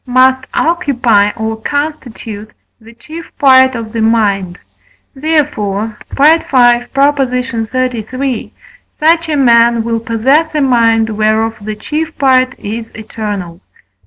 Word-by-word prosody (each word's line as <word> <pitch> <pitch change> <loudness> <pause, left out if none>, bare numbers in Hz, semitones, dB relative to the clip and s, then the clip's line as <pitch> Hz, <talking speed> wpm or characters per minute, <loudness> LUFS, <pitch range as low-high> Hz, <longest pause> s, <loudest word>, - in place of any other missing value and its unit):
must 260 +1 +3
occupy 250 - +1
or 220 0 -3
constitute 240 -8 -5 0.3
the 225 0 -16
chief 315 +7 -10
part 260 -3 +5
of 225 -1 -6
the 230 - -2
mind; 200 -5 0 0.6
therefore 265 -9 -1
(V. 275 - -2 0.2
xxxiii.), 255 -1 0 0.5
such 330 +1 +2
a 300 - 0
man 235 -3 +3
will 230 0 -2
possess 265 +8 0
a 300 - +1
mind 230 -4 +2
whereof 220 +1 0
the 215 +1 -5
chief 310 +8 -4
part 255 -2 +2
is 225 +2 -6
eternal. 205 -5 -6
240 Hz, 110 wpm, -13 LUFS, 220-275 Hz, 0.6 s, part